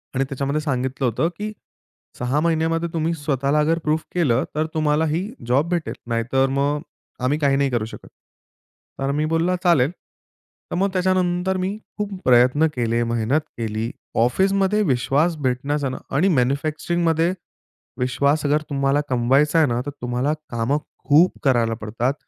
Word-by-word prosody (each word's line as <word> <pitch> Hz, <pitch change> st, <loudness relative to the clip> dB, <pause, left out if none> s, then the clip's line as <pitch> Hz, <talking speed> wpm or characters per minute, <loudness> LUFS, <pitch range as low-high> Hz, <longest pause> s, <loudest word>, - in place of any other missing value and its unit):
आणि 135 Hz, -, +2 dB
त्याच्यामध्ये 140 Hz, +2 st, -1 dB
सांगितलं 130 Hz, -2 st, -2 dB
होतं 120 Hz, +8 st, +1 dB
की 210 Hz, +1 st, -4 dB, 0.7 s
"6 125 Hz, +4 st, 0 dB
महिन्यामध्ये 165 Hz, 0 st, +1 dB
तुम्ही 165 Hz, 0 st, 0 dB
स्वतःला 145 Hz, -1 st, 0 dB
अगर 160 Hz, +2 st, +2 dB
प्रूफ 155 Hz, +1 st, 0 dB
केलं 135 Hz, -8 st, +2 dB
तर 155 Hz, +1 st, +1 dB
तुम्हाला 155 Hz, 0 st, +2 dB
ही 165 Hz, +6 st, -1 dB, 0.2 s
जॉब 140 Hz, +7 st, +2 dB
भेटेल. 175 Hz, -2 st, -1 dB
नाहीतर 120 Hz, +3 st, +1 dB
मग 140 Hz, +2 st, 0 dB, 0.4 s
आम्ही 135 Hz, +4 st, +2 dB
काही 140 Hz, -2 st, +3 dB
नाही 140 Hz, 0 st, +2 dB
करू 120 Hz, -4 st, -1 dB
शकत." 110 Hz, -, -11 dB, 0.9 s
तर 135 Hz, +1 st, 0 dB
मी 155 Hz, -, +1 dB
बोलला 165 Hz, +3 st, +1 dB
चालेल. 160 Hz, -5 st, +4 dB, 0.8 s
तर -, -, -1 dB
मग 195 Hz, +3 st, +1 dB
त्याच्यानंतर 185 Hz, 0 st, +1 dB
मी 190 Hz, +3 st, -2 dB, 0.2 s
खूप 210 Hz, -1 st, -2 dB, 0.2 s
प्रयत्न 130 Hz, +5 st, +5 dB
केले, 120 Hz, -1 st, 0 dB
मेहनत 120 Hz, +5 st, 0 dB, 0.2 s
केली, 110 Hz, 0 st, -3 dB, 0.3 s
ऑफिसमध्ये 195 Hz, -, +2 dB
विश्वास 145 Hz, +3 st, +1 dB
भेटण्याचा 135 Hz, +2 st, 0 dB
ना 130 Hz, -, -5 dB, 0.2 s
आणि 170 Hz, +8 st, +3 dB
मॅन्युफॅक्चरिंगमध्ये 155 Hz, +5 st, +1 dB, 0.7 s
विश्वास 140 Hz, +4 st, +1 dB
अगर 150 Hz, +1 st, +2 dB
तुम्हाला 140 Hz, 0 st, +1 dB
कमवायचा 135 Hz, +5 st, +3 dB
आहे 155 Hz, -, +4 dB
ना, 120 Hz, 0 st, 0 dB
तर 145 Hz, -, -4 dB
तुम्हाला 125 Hz, +4 st, 0 dB, 0.2 s
कामं 120 Hz, +5 st, 0 dB, 0.3 s
खूप 155 Hz, +5 st, +5 dB
करायला 120 Hz, -5 st, +2 dB
पडतात 115 Hz, +5 st, -1 dB
145 Hz, 150 wpm, -22 LUFS, 125-165 Hz, 0.9 s, प्रयत्न